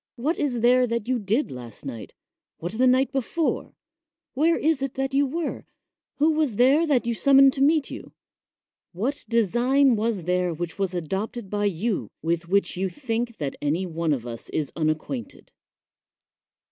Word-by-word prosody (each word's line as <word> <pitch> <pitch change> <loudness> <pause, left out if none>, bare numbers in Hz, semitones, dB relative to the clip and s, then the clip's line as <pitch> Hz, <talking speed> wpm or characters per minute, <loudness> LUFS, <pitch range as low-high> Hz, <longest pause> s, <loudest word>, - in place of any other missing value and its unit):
What 295 +8 -1
is 250 -5 -1
there 250 +1 +4
that 235 -1 -2
you 255 -1 +1
did 220 +8 0
last 125 0 -9
night, 120 -5 -7 0.4
what 175 +2 -5
the 255 +3 +3
night 260 +1 +3
before 285 +4 -2 0.3
— - - -67
where 325 +5 +3
is 310 -3 +1
it 275 -2 -3
that 270 0 -2
you 280 +1 +3
were 325 +4 -3 0.3
— - - -66
who 305 +3 +4
was 305 -7 0
there 275 +8 +4
that 265 -5 +2
you 235 - 0
summoned 275 +2 +5
to 270 - -3
meet 300 +1 +3
you - - -8 0.4
— - - -68 0.3
what 245 +11 -2
design 240 +4 +3
was 215 -4 -1
there 180 0 0
which 170 +3 -5
was 190 -2 -1
adopted 195 +5 -4
by 205 0 0
you, 195 - -1
with 170 +1 -1
which 200 +1 +2
you 190 +1 -1
think 235 -2 -3
that 140 -3 -3
any 155 +6 0
one 165 -2 -2
of 125 -5 -1
us 115 -1 -7
is 150 -3 -2
unacquainted? 165 - -3
235 Hz, 180 wpm, -25 LUFS, 175-270 Hz, 0.4 s, summoned